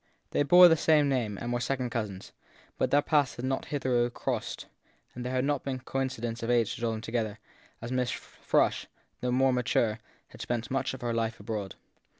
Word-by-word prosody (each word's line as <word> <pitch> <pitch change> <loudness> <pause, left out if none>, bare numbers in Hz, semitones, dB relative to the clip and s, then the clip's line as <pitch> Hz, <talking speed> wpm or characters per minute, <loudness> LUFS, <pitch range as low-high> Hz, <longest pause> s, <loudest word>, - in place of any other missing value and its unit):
They - - +1
bore 175 +5 +8
the 165 - +5
same 155 -2 +4
name 115 -7 -1
and 120 +3 -3
were 120 - 0
second 125 0 -2
cousins; 105 -5 -4 0.5
but - - +2
their 145 +1 +4
paths 145 -4 +2
had 120 - -5
not 135 0 -1
hitherto 125 -4 0
crossed; - - -4 0.5
there 125 +1 -4
had 130 0 0
not 145 -1 0
been 135 -2 -2
coincidence 130 -3 -3
of 115 - -3
age 120 -3 +2
to - - -9
draw 115 - +1
them 110 -1 -3
together; 115 -2 -2 0.5
and 120 - -5
Miss 125 -1 0
Frush, - - 0 0.3
the 125 - -1
more 130 +1 +3
mature, 115 -3 +1 0.3
had - - -12
spent 120 0 -3
much 135 0 -1
of - - -12
her 120 -1 -1
life 115 0 -1
abroad. 105 -5 -4
125 Hz, 195 wpm, -29 LUFS, 115-135 Hz, 0.5 s, bore